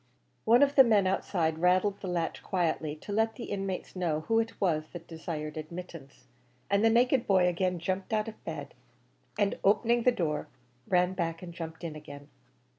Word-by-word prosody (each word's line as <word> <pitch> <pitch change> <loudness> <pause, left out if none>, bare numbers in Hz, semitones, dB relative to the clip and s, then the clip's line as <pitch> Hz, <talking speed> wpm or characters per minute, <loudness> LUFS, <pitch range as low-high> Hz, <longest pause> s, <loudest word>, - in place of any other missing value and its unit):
One 240 +5 +6
of 280 0 +3
the 270 - +9
men 215 -5 +4
outside 165 -4 0
rattled 185 +3 +2
the 190 - -5
latch 170 -2 -2
quietly, 160 -5 -1
to 155 - -9
let 225 +2 +1
the 240 - -7
inmates 195 -3 -4
know 165 -4 -1
who 225 +8 +1
it 225 0 -3
was 155 -5 +1
that 170 -2 -8
desired 160 -2 -6
admittance; 160 -3 -9 0.5
and 200 +1 +3
the 225 - +6
naked 245 +2 +3
boy 185 -2 +4
again 180 +1 0
jumped 185 +4 -3
out 215 0 0
of 220 - -9
bed, - - -6 0.6
and 205 -2 +1
opening 235 +4 +3
the 250 - +4
door, 160 -9 -2 0.4
ran 180 0 +2
back 165 -2 -3
and 170 -1 -8
jumped 165 0 -7
in 160 -2 -5
again. 145 -1 -11
180 Hz, 185 wpm, -29 LUFS, 165-210 Hz, 0.6 s, the